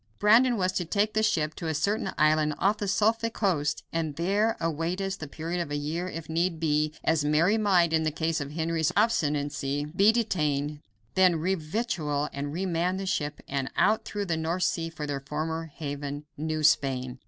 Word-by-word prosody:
Brandon 235 +4 +5
was 185 -1 +1
to 185 - -1
take 205 +5 0
the 220 - +2
ship 155 -8 +1
to 165 - -6
a 160 - -1
certain 200 +8 0
island 155 0 +3
off 200 +3 +2
the 205 - -2
Suffolk 225 +3 +1
coast 165 -8 0
and 160 -3 -2
there 200 +7 +1
await 165 +3 -1
us 195 0 -2
the 160 -6 -7
period 165 +4 -3
of 160 - -4
a 145 - -2
year 155 +5 -2
if 165 -2 -7
need 165 +1 0
be, 155 -1 +1
as 160 -2 +2
Mary 155 +7 +3
might, 185 -6 +3
in 160 -1 +2
case 160 0 -1
of 140 - -4
Henry's 160 -1 0
obstinacy, 145 -8 0
be 200 +3 +6
detained; 150 -10 0 0.3
then 185 0 +5
re 170 +4 0
victual 155 -5 -2
and 140 +1 -4
re 180 +5 -2
man 180 +1 0
the 195 - -4
ship 150 -5 -2
and 135 -1 -2
out 215 +1 +3
through 205 -1 -4
the 170 -4 -1
North 165 +3 -1
Sea 165 -1 0
for 155 -2 -6
their 145 -1 -3
former 155 +4 -3
haven, 145 -1 -6
New 155 0 -2
Spain. 130 -4 +2
160 Hz, 195 wpm, -27 LUFS, 150-190 Hz, 0.3 s, be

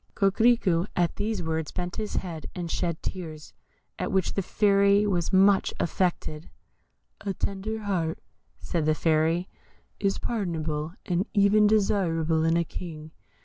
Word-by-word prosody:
Coquerico 195 -3 +3
at 175 -1 +1
these 210 -3 -2
words 160 -1 -2
bent 180 -1 -4
his 215 -1 -4
head 165 -4 -4
and 175 -2 -4
shed 170 -3 -2
tears, 160 -4 -6 0.5
at - - -2
which 190 -2 +1
the 195 - 0
Fairy 200 +1 +3
was 180 -4 0
much 195 +1 +4
affected. 170 -3 -1 0.7
"A 195 -2 -2
tender 215 +4 -3
heart," 170 -5 -1 0.4
said 160 -3 -2
the 155 - +3
Fairy, 160 +3 +1 0.5
"is 195 -1 +1
pardonable, 160 -6 -3
and 180 0 0
even 205 +1 +5
desirable 170 -7 +2
in 165 +1 +3
a 170 - +2
King. 160 -3 -8
180 Hz, 140 wpm, -27 LUFS, 165-200 Hz, 0.7 s, even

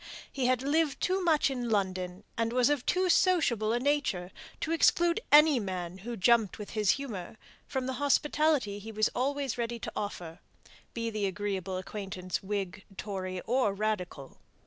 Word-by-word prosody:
He 260 -3 0
had 255 0 +2
lived 295 +1 +1
too 375 +1 0
much 310 -5 +3
in 245 -3 -3
London, 185 -2 -1
and 230 0 0
was 250 +2 +3
of 285 -4 -1
too 370 0 +2
sociable 310 - +3
a 240 - +1
nature, 255 -10 0 0.3
to 320 - -2
exclude 340 +2 +3
any 300 -2 +7
man 185 -3 -4
who 235 +4 -6
jumped 225 +1 +3
with 210 -2 -8
his 210 -3 +3
humour 220 -9 -6 0.3
from 265 -1 -2
the 260 - -2
hospitality 285 -6 +2
he 220 +2 -8
was 215 0 +2
always 275 0 -2
ready 235 0 -2
to - - -6
offer, 175 -5 -5 0.6
be 230 -1 -2
the 210 -2 -1
agreeable 190 -1 -3
acquaintance 185 -1 -5
Whig, 195 -2 -4
Tory, 185 -3 -4
or 240 -5 +1
Radical. 190 -9 -3
225 Hz, 165 wpm, -30 LUFS, 195-275 Hz, 0.6 s, any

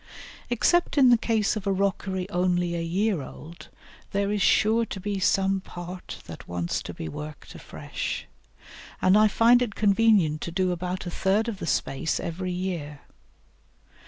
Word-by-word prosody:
Except 325 +9 +2
in 265 -3 +7
the 240 - +7
case 220 -2 +1
of 205 -2 -5
a - - +3
rockery 190 -1 -1
only 180 -2 +1
a 170 - -2
year 185 +1 0
old, 155 +4 -11 0.4
there 200 0 0
is 210 -1 -1
sure 220 +3 +4
to 215 - -6
be 200 +1 -3
some 195 0 +2
part 180 0 -8
that - - -10
wants 85 0 -2
to - - -7
be 80 - -6
worked 150 - -8
afresh, - - -5 0.7
and 185 +1 +4
I 215 +1 +6
find 235 +4 +5
it 235 -4 -2
convenient 200 -7 +3
to 170 - -4
do 185 +1 +1
about 180 +2 -3
a 175 - -4
third 200 +6 +1
of 215 -5 -4
the - - -5
space 140 +2 -1
every 180 +2 -4
year. 175 -6 -4
190 Hz, 165 wpm, -26 LUFS, 170-210 Hz, 0.7 s, in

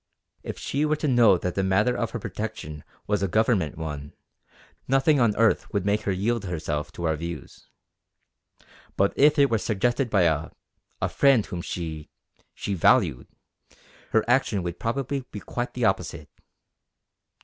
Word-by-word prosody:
If - - -6
she 140 +2 -2
were 155 0 +2
to 150 - -2
know 120 -7 +5
that 90 +1 -3
the 95 - 0
matter 95 +6 +2
of 115 - -1
her - - -4
protection 100 -9 -6 0.2
was 105 -2 0
a 100 - +1
Government 95 - +1
one, 75 -3 -6 0.7
nothing 135 +3 +3
on 115 -4 +3
earth 115 0 +2
would 100 -2 -1
make 105 +1 +1
her - - +3
yield 105 +3 -1
herself 80 -4 -3
to 85 - -7
our 80 -2 +1
views. 85 +1 -8 1.3
But 100 0 +2
if 150 +2 +5
it 140 -2 +4
were 115 - +2
suggested 120 +5 0
by 100 -4 +3
a 80 -2 +1 0.5
a - - +3
friend 135 -6 +3
whom 90 - -5
she 80 -3 -5 0.5
she 100 - -3
valued, 85 - +3 0.8
her 110 - +2
action 120 -6 +2
would 85 0 -5
probably 135 +4 -2
be 105 - -7
quite 120 +4 -5
the 125 -2 0
opposite. - - -1
105 Hz, 160 wpm, -25 LUFS, 85-120 Hz, 1.3 s, know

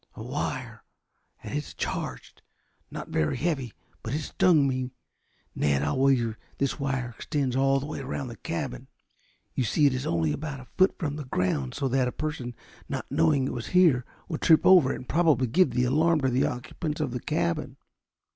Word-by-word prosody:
"A - - -7
wire, - - -4 0.6
and - - -5
it's 150 0 -4
charged. - - -5 0.5
Not - - -7
very 75 -2 0
heavy, 140 -8 -1 0.3
but - - -3
it 155 - -1
stung 155 -2 +3
me. 130 -1 -1 0.6
Ned, 70 -1 +1
I'll 75 - 0
wager 130 -4 +3
that - - -32
this 140 +2 -1
wire 135 -3 -2
extends 140 -4 -2
all 135 +1 +3
the 135 - -5
way 150 - -5
around 135 -1 -4
this 115 - -9
cabin. - - -4 0.7
You 130 - 0
see 145 +6 +2
it 140 - +4
is 130 +1 -3
only 80 -3 +1
about 150 -3 -5
a 130 - -11
foot 190 +1 +3
from 150 -4 -3
the 150 - -6
ground 90 - -1
so 135 - -1
that 130 0 +2
a - - -1
person 130 -6 -4 0.3
not - - -4
knowing 140 -4 +3
it - - -2
was 120 - -5
here 155 -9 +5 0.2
would 160 -4 -4
trip 160 -2 +5
over 175 -8 +7
it - - -2
and 125 - -9
probably 155 -5 +3
give 175 +10 +3
the 125 - 0
alarm 155 +5 +3
to 130 - +2
the 125 +1 +2
occupants 155 +4 -4
of 150 -5 -1
the 125 - -3
cabin. 155 -2 -2
135 Hz, 195 wpm, -27 LUFS, 125-155 Hz, 0.7 s, over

